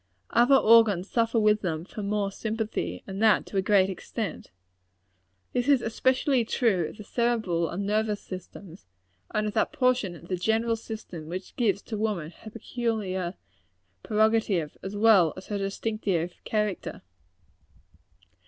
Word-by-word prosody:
Other 240 +4 +5
organs 215 -6 +5
suffer 230 -1 +2
with 210 0 +3
them 165 -3 -3
from 200 +1 -5
mere 205 -1 0
sympathy; 215 - -3
and 195 +1 -6
that 220 -1 +4
to - - -14
a - - +4
very 195 -1 +4
great - - -4
extent. 200 0 -5 1.0
This 245 +1 0
is 280 -2 +5
especially 260 +2 +2
true 215 - +1
of - - -13
the 210 - -8
cerebral 220 -8 0
and 195 +3 -3
nervous 210 0 0
system; 185 -1 -10 0.5
and 215 - -1
of 210 - -2
that - - +1
portion 250 -8 +1
of 170 0 -13
the 185 - -2
general 225 +5 +1
system 215 -8 -8
which 185 +3 -7
gives 205 -5 +1
to 215 -3 -5
woman 200 -8 -2
her 220 - -12
peculiar 205 -6 -3 0.7
prerogative, 215 - +1
as 195 +2 -6
well 205 -7 +5
as 185 - -9
her 205 -1 -2
distinctive 195 -3 -2
character. 210 -3 -2
210 Hz, 150 wpm, -27 LUFS, 185-225 Hz, 1.0 s, Other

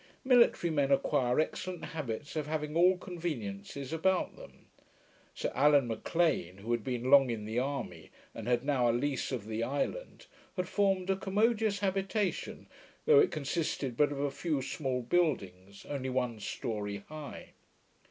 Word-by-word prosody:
Military 240 -9 +4
men 140 -3 +1
acquire 125 -2 +2
excellent 175 +1 -2
habits 150 -3 -5
of 150 -2 -2
having 150 0 -3
all 180 +2 +5
conveniencies 140 - -5
about 180 +3 +1
them. - - -14 0.7
Sir - - -2
Allan 145 -2 +4
M'Lean, 115 - 0
who 110 +4 -5
had 120 -2 0
been 125 +1 -2
long 135 -2 +7
in 110 -3 -3
the 110 +3 -1
army, 135 -1 -4 0.2
and 115 0 -7
had 120 +1 +1
now 130 -5 +2
a - - +3
lease 135 +3 -1
of 120 -6 -3
the 110 +1 -3
island, 145 - -3 0.3
had 180 -2 -2
formed 195 -1 +1
a - - +2
commodious 210 +1 +1
habitation, 195 +1 -1 0.4
though 460 -2 +7
it 425 - +5
consisted 140 -3 -2
but 145 +3 +3
of 140 - -4
a 140 0 0
few 155 0 -1
small 130 -2 -2
buildings, 100 - -1
only 135 -2 -3
one 125 -3 -1
story 105 -2 -4
high. 155 -2 -9
145 Hz, 155 wpm, -31 LUFS, 120-175 Hz, 0.7 s, long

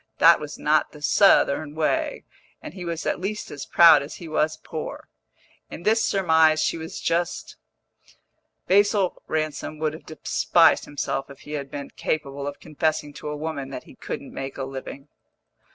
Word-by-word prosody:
That 170 +1 +7
was 150 -1 -7
not 155 +1 +1
the 150 - -13
Southern 155 -6 +4
way, 155 -1 -1 0.4
and - - -9
he 185 -2 -8
was 165 -1 -4
at - - 0
least 205 +4 -4
as 145 -1 -7
proud 165 -4 +7
as 140 +3 -7
he 170 - -9
was 155 0 0
poor. 155 -2 -7 0.6
In 170 - -9
this 220 +3 +3
surmise 160 -5 +4
she - - +1
was 160 0 -7
just; 170 +1 -2 1.1
Basil 200 -1 +2
Ransom 155 0 -3
would 155 0 -1
have 160 - -12
despised 160 +2 +3
himself 140 -1 -3
if 140 - -13
he 150 - -11
had 140 -2 -4
been 140 0 -7
capable 140 -2 -3
of 145 - -6
confessing 150 -1 -2
to 150 - -8
a 150 - -4
woman 145 -3 -4
that 135 - -7
he - - -15
couldn't - - -7
make 135 0 -6
a 135 - -3
living. 135 +1 -7
155 Hz, 170 wpm, -24 LUFS, 145-165 Hz, 1.1 s, That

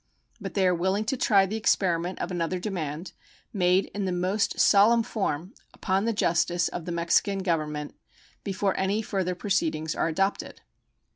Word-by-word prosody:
But - - -7
they 195 - +2
are 180 - +4
willing 190 +5 0
to 265 +5 -1
try 200 -6 +4
the 210 +3 -3
experiment 180 -5 +1
of 175 - -4
another 175 0 -1
demand, 175 -3 -4 0.4
made 185 -1 +3
in 200 -1 -2
the 185 - -1
most 185 +4 -1
solemn 225 +3 +5
form, 190 -5 -3 0.2
upon 195 +1 0
the 230 - +1
justice 175 -4 +1
of 175 - -6
the 175 - -4
Mexican 170 +3 +1
Government 150 -4 -2 0.5
before 195 0 -1
any 200 +3 0
further 190 -4 -2
proceedings 160 -5 -1
are - - 0
adopted. 195 +5 -2
185 Hz, 160 wpm, -26 LUFS, 170-200 Hz, 0.5 s, solemn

